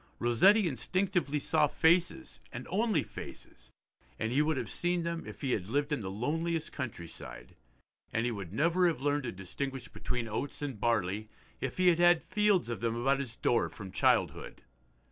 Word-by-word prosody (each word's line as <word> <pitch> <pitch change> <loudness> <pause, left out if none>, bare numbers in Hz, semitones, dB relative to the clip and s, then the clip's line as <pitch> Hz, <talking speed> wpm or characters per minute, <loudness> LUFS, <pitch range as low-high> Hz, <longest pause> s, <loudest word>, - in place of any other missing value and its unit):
Rossetti 185 - +5
instinctively 175 - 0
saw 150 +1 +2
faces, 170 +4 +2
and 125 0 -6
only 220 +3 +2
faces, - - -10 0.5
and 110 +1 -2
he 140 +4 +3
would 155 -1 +1
have - - -2
seen 175 0 0
them 170 0 -3
if - - -9
he 135 -3 -1
had 95 -6 -1
lived 145 +4 0
in 150 - +1
the 95 - -4
loneliest 160 - -2
countryside, 85 - -7 0.6
and 115 +1 0
he 120 - 0
would 100 -6 -6
never 170 - +3
have 165 -5 -1
learned 145 -1 +1
to 120 - -2
distinguish 125 +8 -5
between 125 -2 -3
oats 130 +7 -4
and 135 -7 -4
barley 110 -2 0 0.3
if 130 - -4
he 185 0 +5
had 170 -1 +3
had 175 -1 +5
fields 210 - +2
of 120 -1 -3
them 115 0 -1
about 135 +4 +2
his 125 -5 -5
door 120 -1 +1
from 95 -3 -9
childhood. - - +1
140 Hz, 180 wpm, -31 LUFS, 115-170 Hz, 0.6 s, Rossetti